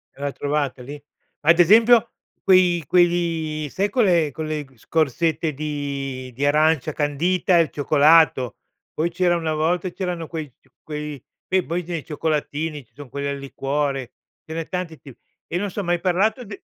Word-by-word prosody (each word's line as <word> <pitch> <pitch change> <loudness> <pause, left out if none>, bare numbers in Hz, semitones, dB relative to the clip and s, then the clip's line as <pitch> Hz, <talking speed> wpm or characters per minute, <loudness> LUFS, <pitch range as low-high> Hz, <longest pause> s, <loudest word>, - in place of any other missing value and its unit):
E - - -19
l'ha 145 0 -1
trovata 140 -3 -2
lì? 145 +3 -9 0.4
Ad 170 +3 +4
esempio, 230 +6 +6 0.3
quei 180 -3 +4
quegli 165 -4 +1
sai 195 +8 -1
quelle- 180 - +2
quelle 155 0 -4
scorzette 160 +4 0
di 140 -3 -4
di 135 +4 -2
arancia 155 0 +2
candita 170 +5 +1
e 170 - +6
il 160 - -6
cioccolato. 145 -4 +4 0.4
Poi 165 +2 0
c'era 175 0 +2
una 160 -2 -2
volta 170 +4 0
c'erano 175 -3 -4
quei 155 -4 -6
c - - -31 0.2
quei 150 -3 -6 0.4
poi 175 +2 -2
quei 170 -3 -5
cioccolatini, 150 -2 -2
ci - - -41
son 145 -2 -11
quelli 140 +3 -4
al 140 0 -2
liquore, 140 -1 -3 0.3
ce 160 - -8
n'è 165 0 -4
tanti 180 -4 -5
ti 135 -5 -13 0.4
e 175 - 0
non 200 +2 -2
so 205 - -5
hai 195 - -3
mai 175 0 +1
parlato 200 +8 +1
d 200 0 -9
155 Hz, 165 wpm, -22 LUFS, 145-175 Hz, 0.4 s, esempio